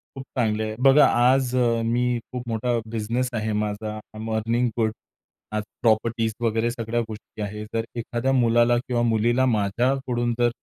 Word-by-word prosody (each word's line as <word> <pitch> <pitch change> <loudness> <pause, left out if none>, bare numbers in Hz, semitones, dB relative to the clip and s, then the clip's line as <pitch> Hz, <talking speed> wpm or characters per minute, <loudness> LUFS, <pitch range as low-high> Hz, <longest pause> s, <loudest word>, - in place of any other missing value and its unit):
खूप 135 - -6
चांगली 110 -3 +1
आहे. 110 0 -4
बघा, 135 +3 +6
आज 125 +1 +3 0.3
मी 120 +1 +1
खूप 125 -1 -4
मोठा 115 +2 0
बिझनेस 115 +3 -1
आहे 110 -1 -1
माझा. 105 0 -2
आय 110 - -7 0.2
ॲम 110 +1 -4
अर्निंग 115 +3 +1
गुड 110 -1 +2 0.6
आज 105 - -1 0.2
प्रॉपर्टीज 115 0 +1
वगैरे 115 0 +1
सगळ्या 115 0 -2
गोष्टी 110 0 -9
आहेत. 105 +1 -5
जर 115 - +1
एखाद्या 120 +2 -1
मुलाला 120 +1 +4
किंवा 120 -1 0
मुलीला 120 +3 +2
माझ्याकडून 120 +2 0
जर 120 0 +4
115 Hz, 160 wpm, -24 LUFS, 110-120 Hz, 0.6 s, बघा